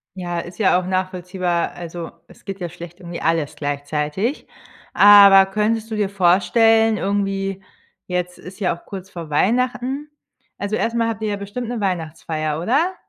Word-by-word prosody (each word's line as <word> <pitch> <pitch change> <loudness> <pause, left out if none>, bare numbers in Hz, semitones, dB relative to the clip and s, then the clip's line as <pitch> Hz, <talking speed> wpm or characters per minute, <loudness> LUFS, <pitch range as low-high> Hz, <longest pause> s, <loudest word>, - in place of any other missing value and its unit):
Ja, 175 -2 -3
ist 175 +1 -8
ja 185 -3 +4
auch 185 - -6
nachvollziehbar, 185 -2 -1
also, 170 -1 -7 0.2
es - - -19
geht 195 0 -6
ja 175 - -4
schlecht 175 +1 -11
irgendwie 175 -1 -7
alles 160 -2 0
gleichzeitig. 150 - -3 0.5
Aber 200 -1 +8
könntest 215 +2 -1
du - - -1
dir 205 -2 0
vorstellen, 215 +4 +3
irgendwie 195 -1 -2 0.4
jetzt 180 0 -3
ist 185 +3 -11
ja 180 -3 0
auch 170 - -19
kurz 190 -1 -8
vor 170 -3 -8
Weihnachten 250 - 0 0.5
also, 205 +1 -2
erst 230 +1 -1
mal 230 -1 +1
habt 220 -1 -4
ihr 215 - -1
ja 205 - -1
bestimmt 205 +4 -6
'ne 240 -1 -3
Weihnachtsfeier, 160 -4 -3
oder? 285 - +1
190 Hz, 165 wpm, -20 LUFS, 175-215 Hz, 0.5 s, Aber